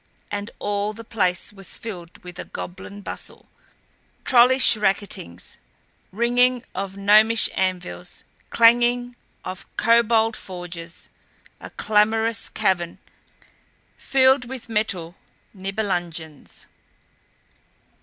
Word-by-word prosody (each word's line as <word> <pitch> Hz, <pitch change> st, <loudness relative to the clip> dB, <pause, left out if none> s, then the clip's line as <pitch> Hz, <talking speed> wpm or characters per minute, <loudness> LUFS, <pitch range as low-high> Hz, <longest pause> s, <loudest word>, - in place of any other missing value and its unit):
And 205 Hz, +1 st, -3 dB
all 205 Hz, +1 st, -1 dB
the 225 Hz, +2 st, -9 dB
place 185 Hz, -5 st, -1 dB
was 195 Hz, -2 st, -6 dB
filled 180 Hz, -7 st, -9 dB
with 180 Hz, 0 st, -10 dB
a -, -, -4 dB
goblin 190 Hz, +3 st, -8 dB
bustle, -, -, -7 dB, 0.8 s
trollish 255 Hz, 0 st, +6 dB
racketings, 195 Hz, -, -2 dB, 0.5 s
ringing 245 Hz, +3 st, +2 dB
of 195 Hz, +1 st, -4 dB
gnomish 215 Hz, +3 st, +5 dB
anvils, 180 Hz, -, -3 dB, 0.3 s
clanging 240 Hz, +1 st, +4 dB, 0.3 s
of 185 Hz, 0 st, -7 dB
kobold 230 Hz, -1 st, +4 dB
forges 175 Hz, -2 st, -8 dB, 0.5 s
a -, -, -9 dB
clamorous 220 Hz, +2 st, +1 dB
cavern 175 Hz, -3 st, 0 dB, 1.0 s
filled 265 Hz, -1 st, +3 dB
with 250 Hz, -1 st, -8 dB
metal 195 Hz, -6 st, -1 dB, 0.4 s
Nibelungens. 175 Hz, -6 st, -4 dB
205 Hz, 90 wpm, -23 LUFS, 180-230 Hz, 1.0 s, trollish